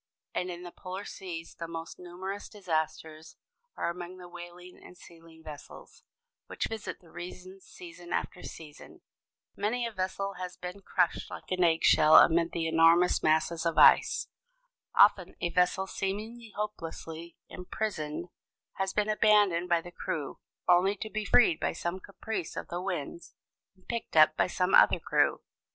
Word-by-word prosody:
And 180 Hz, -, -2 dB
in 175 Hz, 0 st, -7 dB
the 175 Hz, -, -8 dB
polar 185 Hz, +3 st, -7 dB
seas 165 Hz, -3 st, -7 dB
the 165 Hz, -, -7 dB
most 165 Hz, 0 st, -7 dB
numerous 185 Hz, +3 st, -7 dB
disasters 160 Hz, -4 st, -4 dB, 0.4 s
are -, -, -1 dB
among 180 Hz, +1 st, -8 dB
the 180 Hz, -1 st, -11 dB
whaling 175 Hz, +1 st, -11 dB
and 180 Hz, -, -14 dB
sealing 165 Hz, -2 st, -16 dB
vessels, 150 Hz, -2 st, -11 dB, 0.5 s
which -, -, -3 dB
visit 220 Hz, -2 st, -6 dB
the 170 Hz, -, -19 dB
regions 185 Hz, +2 st, -10 dB
season 175 Hz, 0 st, -12 dB
after 180 Hz, -, -3 dB
season. 160 Hz, -, -11 dB, 0.5 s
Many 230 Hz, +4 st, -1 dB
a 230 Hz, -, -3 dB
vessel 195 Hz, 0 st, -3 dB
has 180 Hz, -1 st, -6 dB
been 180 Hz, +2 st, -7 dB
crushed 180 Hz, -2 st, 0 dB
like -, -, -10 dB
an 180 Hz, -1 st, +2 dB
egg 165 Hz, -1 st, +2 dB
shell 155 Hz, +1 st, +6 dB
amid 170 Hz, 0 st, +6 dB
the 165 Hz, -1 st, -2 dB
enormous 165 Hz, +2 st, +4 dB
masses 160 Hz, +1 st, +1 dB
of 165 Hz, -2 st, -1 dB
ice. -, -, +6 dB, 0.7 s
Often 190 Hz, -3 st, +5 dB
a 175 Hz, -, -1 dB
vessel 180 Hz, +1 st, +2 dB
seemingly 215 Hz, +5 st, -5 dB
hopelessly 170 Hz, -5 st, -6 dB
imprisoned 180 Hz, -4 st, -4 dB, 0.5 s
has 190 Hz, 0 st, -1 dB
been 210 Hz, 0 st, +1 dB
abandoned 205 Hz, -5 st, +3 dB
by 170 Hz, -1 st, +3 dB
the 175 Hz, +1 st, -11 dB
crew, 165 Hz, -6 st, -5 dB, 0.3 s
only 180 Hz, +3 st, +4 dB
to 215 Hz, +2 st, -7 dB
be 215 Hz, -1 st, -3 dB
freed 195 Hz, -7 st, +4 dB
by -, -, -1 dB
some 175 Hz, +2 st, -4 dB
caprice 200 Hz, -1 st, -6 dB
of -, -, -6 dB
the 175 Hz, +1 st, -4 dB
winds 170 Hz, -3 st, -5 dB, 0.4 s
and 185 Hz, -, -28 dB
picked 235 Hz, -8 st, -4 dB
up 155 Hz, 0 st, +7 dB
by -, -, +2 dB
some 180 Hz, +1 st, -1 dB
other -, -, +6 dB
crew. -, -, +1 dB
180 Hz, 160 wpm, -29 LUFS, 165-195 Hz, 0.7 s, up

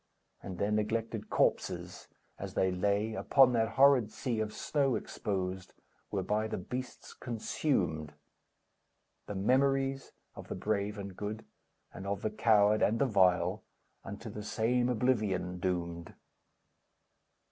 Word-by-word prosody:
And 95 Hz, -2 st, -7 dB
their 100 Hz, +3 st, 0 dB
neglected 110 Hz, +1 st, -1 dB
corpses, -, -, 0 dB, 0.3 s
as -, -, -6 dB
they 95 Hz, -, +2 dB
lay 100 Hz, +4 st, 0 dB
Upon 130 Hz, +2 st, +4 dB
that 115 Hz, -1 st, +1 dB
horrid 135 Hz, -5 st, +5 dB
sea 115 Hz, +1 st, -2 dB
of 110 Hz, -1 st, -1 dB
snow 135 Hz, +1 st, 0 dB
exposed, 95 Hz, -2 st, -4 dB, 0.3 s
Were 95 Hz, -2 st, -2 dB
by 105 Hz, +3 st, 0 dB
the -, -, -3 dB
beasts 125 Hz, +8 st, -6 dB
consumed; 90 Hz, -, -2 dB, 1.1 s
The 105 Hz, -, -5 dB
memories 135 Hz, +5 st, +1 dB, 0.2 s
of -, -, -10 dB
the -, -, -4 dB
brave 105 Hz, 0 st, -1 dB
and 100 Hz, -2 st, -7 dB
good, 105 Hz, +2 st, -5 dB, 0.5 s
And 95 Hz, -, -7 dB
of 100 Hz, 0 st, -3 dB
the 110 Hz, -, 0 dB
coward 105 Hz, -1 st, +4 dB
and 110 Hz, -, +3 dB
the 140 Hz, -, +2 dB
vile, 95 Hz, -7 st, +3 dB, 0.4 s
Unto 100 Hz, +3 st, -7 dB
the 105 Hz, -, -6 dB
same 115 Hz, +4 st, +1 dB
oblivion 105 Hz, -7 st, 0 dB
doomed! 85 Hz, -2 st, -3 dB
105 Hz, 130 wpm, -32 LUFS, 95-120 Hz, 1.1 s, horrid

